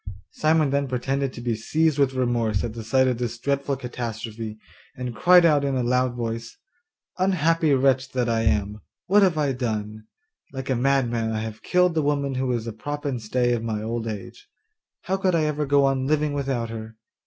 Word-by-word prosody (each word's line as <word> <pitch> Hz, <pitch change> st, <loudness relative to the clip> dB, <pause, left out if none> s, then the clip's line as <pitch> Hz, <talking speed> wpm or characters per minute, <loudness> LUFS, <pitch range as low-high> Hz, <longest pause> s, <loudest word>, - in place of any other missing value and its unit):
Simon 155 Hz, -2 st, +2 dB
then 140 Hz, 0 st, +1 dB
pretended 135 Hz, +2 st, -1 dB
to 120 Hz, -, -9 dB
be 120 Hz, -1 st, -1 dB
seized 150 Hz, +6 st, 0 dB
with 135 Hz, -2 st, +2 dB
remorse 120 Hz, -5 st, 0 dB
at 115 Hz, -, -3 dB
the 115 Hz, -1 st, -7 dB
sight 130 Hz, +4 st, +3 dB
of 125 Hz, -2 st, 0 dB
this 120 Hz, -1 st, -3 dB
dreadful 140 Hz, +2 st, -1 dB
catastrophe, 115 Hz, -3 st, -5 dB, 0.4 s
and 125 Hz, -2 st, -5 dB
cried 175 Hz, +9 st, +6 dB
out 150 Hz, -3 st, +4 dB
in 140 Hz, -1 st, 0 dB
a 125 Hz, -, 0 dB
loud 125 Hz, 0 st, +1 dB
voice, 115 Hz, -1 st, -4 dB, 0.6 s
'Unhappy 165 Hz, -4 st, +2 dB
wretch 130 Hz, 0 st, +2 dB
that 125 Hz, -2 st, 0 dB
I 115 Hz, -1 st, +1 dB
am! 105 Hz, -1 st, 0 dB, 0.2 s
What 205 Hz, +3 st, +4 dB
have 185 Hz, -5 st, +3 dB
I 145 Hz, -2 st, +1 dB
done? 110 Hz, -4 st, -4 dB, 0.5 s
Like 130 Hz, 0 st, -4 dB
a -, -, +2 dB
madman 120 Hz, -3 st, +1 dB
I 110 Hz, -1 st, -2 dB
have 110 Hz, -1 st, -6 dB
killed 180 Hz, -1 st, +2 dB
the 160 Hz, -, +1 dB
woman 140 Hz, -1 st, 0 dB
who 130 Hz, 0 st, -1 dB
is 120 Hz, -2 st, -2 dB
the 115 Hz, -, -5 dB
prop 145 Hz, +7 st, -6 dB
and 130 Hz, -5 st, -2 dB
stay 120 Hz, +3 st, +1 dB
of 120 Hz, -, -1 dB
my 110 Hz, -2 st, -3 dB
old 115 Hz, +1 st, -3 dB
age. 105 Hz, -3 st, -7 dB, 0.5 s
How 190 Hz, +1 st, -1 dB
could 190 Hz, -2 st, +1 dB
I 160 Hz, -, +2 dB
ever 150 Hz, -1 st, -1 dB
go 140 Hz, 0 st, +4 dB
on 135 Hz, -1 st, 0 dB
living 150 Hz, 0 st, +1 dB
without 135 Hz, -5 st, -2 dB
her? 110 Hz, 0 st, -8 dB
130 Hz, 200 wpm, -24 LUFS, 115-145 Hz, 0.6 s, cried